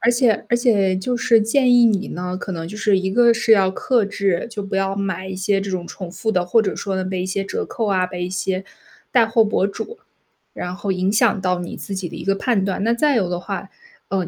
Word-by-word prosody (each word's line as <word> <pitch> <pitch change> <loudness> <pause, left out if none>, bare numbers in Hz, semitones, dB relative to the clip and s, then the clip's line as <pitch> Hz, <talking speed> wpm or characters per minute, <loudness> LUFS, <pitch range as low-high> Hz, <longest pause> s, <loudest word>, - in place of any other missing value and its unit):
而 235 - +3
且 240 -3 +2
而 240 - +3
且 205 -6 +2
就 240 +6 -2
是 230 -1 +4
建 245 +3 +3
议 245 - +6
你 210 -1 +1
呢， 180 +1 -4
可 190 - -6
能 165 -1 -5
就 210 - -8
是 205 -3 +2
一 190 0 -2
个 235 +2 +5
是 230 0 +1
要 190 -3 +5
克 240 +1 +1
制， 200 -2 -1
就 215 -3 -5
不 195 -1 -4
要 195 0 0
买 190 -1 -3
一 190 - -5
些 195 +1 +1
这 195 0 -4
种 175 -2 -3
重 185 -3 -8
复 220 +4 -2
的， 180 -2 +1
或 225 +6 +3
者 215 - -2
说 195 -1 -3
呢， 190 - -1
被 185 -1 -3
一 - - -2
些 195 +1 -2
折 200 - -3
扣 225 -3 -3
啊， 185 -2 +2
被 180 -1 -5
一 180 - -3
些 190 0 -2 0.5
带 240 -3 +5
货 225 0 +3
博 205 -2 +1
主， 415 - -6 0.6
然 180 0 -5
后 200 0 -2
影 185 +1 0
响 220 -2 +2
到 180 -1 0
你 175 - -6
自 195 - -6
己 185 -2 -3
的 - - -9
一 165 - -7
个 195 +1 +1
判 205 -1 0
断。 195 0 -2
那 230 +2 +2
再 290 +2 +2
有 195 -6 +1
的 175 0 -3
话， - - -6 0.4
嗯， 190 -3 -1
195 Hz, 280 characters per minute, -21 LUFS, 185-225 Hz, 0.6 s, 议